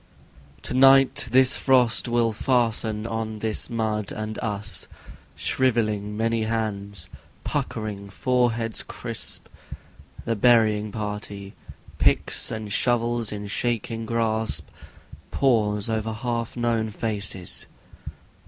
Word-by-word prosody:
To - - -3
night, 135 -1 +6
His 130 +1 +6
frost 125 -4 +3
will 120 -1 +1
fasten 110 -3 0
on 110 -1 -3
this 110 0 -1
mud 110 -3 -2
and 110 0 -5
us, 105 -5 -2 0.5
Shrivelling 110 -5 0
many 115 0 0
hands 100 -4 -3
and - - -13 0.2
puckering 105 -2 -4
foreheads 120 0 0
crisp. - - -2 0.8
The 115 - 0
burying 110 -2 +3
party, 105 -2 -6 0.5
picks - - +2
and 110 -3 -5
shovels 120 -2 +1
in 105 -1 -5
their 100 - -7
shaking 115 0 -2
grasp, 110 - 0 0.6
Pause 105 -6 +1
over 110 0 -2
half 115 +1 -3
known 115 -2 0
faces. 100 -4 -3
110 Hz, 105 wpm, -24 LUFS, 105-120 Hz, 0.8 s, night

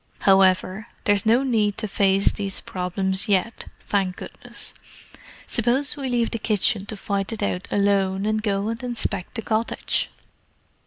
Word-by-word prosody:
However, 190 +2 +3 0.2
there's 205 0 +2
no 240 +4 +5
need 215 -6 +1
to 215 - -2
face 195 0 +3
these 200 -2 -3
problems 190 +1 -2
yet, 205 +3 0 0.2
thank 190 -3 0
goodness. - - -9 0.7
Suppose 250 +5 +1
we 275 -3 -4
leave 240 -2 +1
the 230 - -2
kitchen 210 -1 +1
to 215 - -4
fight 200 0 -2
it 220 -2 -3
out 180 -2 -2
alone, 200 -1 +1
and 215 0 +1
go 205 -1 0
and 230 +1 -4
inspect 235 -5 -3
the 225 - -3
cottage?" 225 +1 0
205 Hz, 150 wpm, -23 LUFS, 195-225 Hz, 0.7 s, no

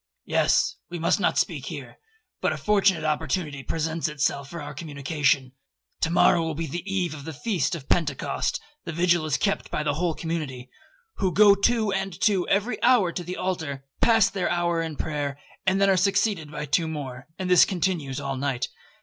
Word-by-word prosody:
'—'Yes. - - +2
We 175 - -5
must 165 0 +2
not - - +1
speak - - 0
here, - - -8 0.4
but - - +2
a - - -2
fortunate 200 -4 +2
opportunity 155 -1 -1
presents 160 +3 -2
itself 140 -2 -1
for 170 - -7
our 145 -1 -7
communication. 140 -3 0 0.5
To - - +1
morrow 170 0 +4
will 160 -1 -2
be 165 +2 -2
the 175 +2 -4
eve 180 -5 0
of 145 -2 -8
the 160 +2 -6
feast 170 - -1
of 140 -5 -9
Pentecost; 150 -6 0 0.2
the 165 - -5
vigil 170 -1 +2
is 150 -3 +1
kept 200 - -1
by 150 - -2
the 150 - 0
whole 165 +1 -1
community, 150 -7 -4 0.5
who 190 -3 +1
go 205 +2 +7
two 215 +1 +2
and 195 -2 -3
two 195 -4 +2
every 205 +5 0
hour 235 -7 +4
to 175 - -4
the 180 +2 -5
altar, 160 -7 -3 0.2
pass 225 -4 +5
their 190 -3 -1
hour 170 -1 +1
in 160 -2 -4
prayer, 145 -2 -3 0.3
and 190 +1 +3
then 195 - +4
are 190 -1 +4
succeeded 195 -3 +1
by 150 0 -4
two 160 +3 +1
more, 135 -4 -6
and 185 - -3
this 180 -2 +7
continues 170 -7 -1
all 140 -1 -3
night. 135 -2 -1
165 Hz, 190 wpm, -25 LUFS, 145-185 Hz, 0.5 s, go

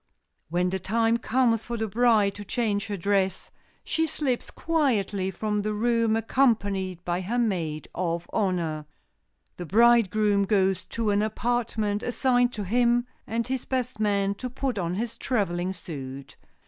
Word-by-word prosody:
When 180 +2 +1
the 190 - -1
time 225 +4 +1
comes 235 -2 +1
for 240 0 -3
the 220 0 -1
bride 215 -2 +3
to 205 - -8
change 205 -1 -1
her 205 -2 -3
dress 190 0 0 0.3
she 320 0 0
slips 275 -5 -2
quietly 215 - 0
from 210 +3 -2
the 210 +1 -2
room, 230 0 +2
accompanied 205 -7 +1
by 175 +1 -1
her 215 +7 -2
maid 170 -10 -1
of 170 -1 -2
honor. 170 -7 -1 0.7
The 175 - -6
bridegroom 215 -1 +4
goes 190 -2 +1
to 220 +2 -1
an 205 0 +2
apartment 220 -1 -1
assigned 245 0 +2
to 210 - -4
him 240 +4 +2 0.2
and 230 +1 -1
his 260 0 -3
best 250 -3 -2
man 200 -2 +1
to 255 - -3
put 255 -3 -2
on 175 0 -2
his 230 +2 -4
traveling 185 -7 -1
suit. 140 -7 -8
210 Hz, 150 wpm, -26 LUFS, 190-235 Hz, 0.7 s, bridegroom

